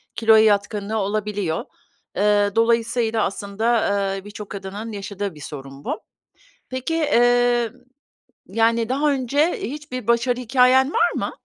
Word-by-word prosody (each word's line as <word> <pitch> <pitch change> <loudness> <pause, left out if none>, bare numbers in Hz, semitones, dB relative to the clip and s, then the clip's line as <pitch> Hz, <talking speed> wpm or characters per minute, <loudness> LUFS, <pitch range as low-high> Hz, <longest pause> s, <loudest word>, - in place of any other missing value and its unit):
kiloya 220 -1 +5
yatkınlığı 205 0 +1
olabiliyor. 205 -4 -2 0.5
Eee, 205 0 +3
dolayısıyla, 230 -1 +1
aslında, 215 +4 -1 0.4
eee, 195 - -9
birçok 205 0 -9
kadının 200 +3 -6
yaşadığı 200 -2 -5
bir 150 - -12
sorun 135 -1 -9
bu. - - -3 0.7
Peki, 260 +5 -3
eee, 245 -6 +3 0.8
yani, 230 0 +1
daha 285 +3 +1
önce 280 +5 +1
hiçbir 255 -4 -6
başarı 235 +1 +2
hikâyen 260 +3 +4
var 350 - +3
mı? - - -2
225 Hz, 120 wpm, -22 LUFS, 205-245 Hz, 0.8 s, kiloya